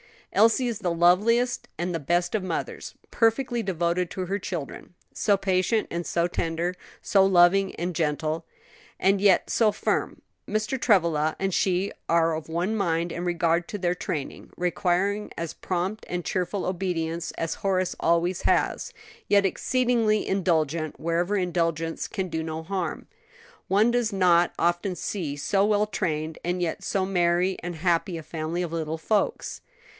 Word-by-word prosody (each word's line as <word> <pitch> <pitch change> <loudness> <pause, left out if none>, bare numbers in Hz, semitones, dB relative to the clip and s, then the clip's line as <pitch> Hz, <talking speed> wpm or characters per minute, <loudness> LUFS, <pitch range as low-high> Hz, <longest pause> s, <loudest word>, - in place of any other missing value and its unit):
"Elsie 230 +4 +4
is 230 -3 -3
the 185 -4 -1
loveliest 210 +9 +3
and 175 +2 -2
the 165 - -1
best 175 +4 0
of 215 - +1
mothers, 180 -3 -4 0.2
perfectly 240 +1 +1
devoted 175 -2 0
to 185 0 -4
her 200 +2 -1
children; 175 -2 -6 0.2
so 205 -2 +2
patient 195 +3 +1
and 170 0 -3
so 170 0 +1
tender, 170 0 -1 0.3
so 195 -2 +4
loving 190 +1 +4
and 175 +2 -3
gentle, 155 0 -1 0.5
and 195 +1 +3
yet 200 -3 +4
so 220 -2 +3
firm. 205 - -2 0.3
Mr. 215 +5 -1
Travilla 165 -8 +3
and 195 -1 -1
she 190 +2 +1 0.2
are 165 -1 +3
of 155 -1 -5
one 175 +6 -1
mind 170 -4 0
in 175 +2 -4
regard 170 -1 +1
to 205 - -5
their 175 -2 0
training, 150 -5 -5
requiring 185 +3 0
as 165 -1 -4
prompt 185 +4 -3
and 175 -1 -3
cheerful 185 +1 -1
obedience 170 -3 -2
as 165 - -3
Horace 185 -2 0
always 170 +2 +1
has; - - +1 0.3
yet 200 -1 +4
exceedingly 235 0 +1
indulgent 160 -5 0
wherever 170 +5 0
indulgence 165 -3 -1
can 190 -1 -3
do 160 -1 -2
no 160 0 -4
harm. 185 0 -3 0.6
One 210 +5 +4
does 240 -2 +1
not 175 -2 +4
often 175 +2 0
see 170 -7 -3
so 195 +7 +1
well 210 0 +3
trained 160 -6 -3
and 180 +1 -1
yet 170 -2 -2
so 190 -1 0
merry 180 0 +1
and 175 0 -5
happy 170 +1 0
a 160 - -7
family 165 +3 -3
of 170 - -4
little 160 -1 -2
folks. 205 +6 -1
180 Hz, 155 wpm, -26 LUFS, 165-195 Hz, 0.6 s, Elsie